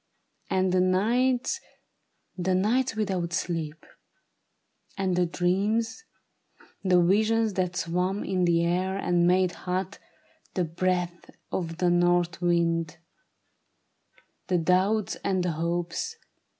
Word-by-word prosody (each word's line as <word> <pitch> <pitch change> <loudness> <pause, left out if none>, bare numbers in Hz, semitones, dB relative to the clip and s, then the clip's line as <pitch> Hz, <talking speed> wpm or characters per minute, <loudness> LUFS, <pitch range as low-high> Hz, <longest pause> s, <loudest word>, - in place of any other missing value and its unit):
And 185 0 +1
the 185 - +3
nights 240 - +2 0.4
— - - -49 0.3
The 185 0 0
nights 225 +6 +1
without 190 -5 -2
sleep; 165 -3 -3 1.1
and 190 -2 0
the 180 0 +2
dreams 205 - 0 0.4
— - - -29
The 185 -2 +4
visions 220 +4 +2
that 180 -1 -1
swam 180 +4 -1
in 185 -2 0
the 170 -1 +3
air, 185 +3 0
and 175 -3 +2
made 185 0 +3
hot 185 +2 -4 0.6
The 185 - +1
breath 175 +1 -2 0.2
of 165 -2 -3
the 180 -1 +2
north 175 0 +2
wind; 165 -2 +1 1.5
the 180 - +2
doubts 185 +5 +1
and 190 -2 +1
the 180 - 0
hopes. 170 - -2
180 Hz, 120 wpm, -27 LUFS, 175-195 Hz, 1.5 s, The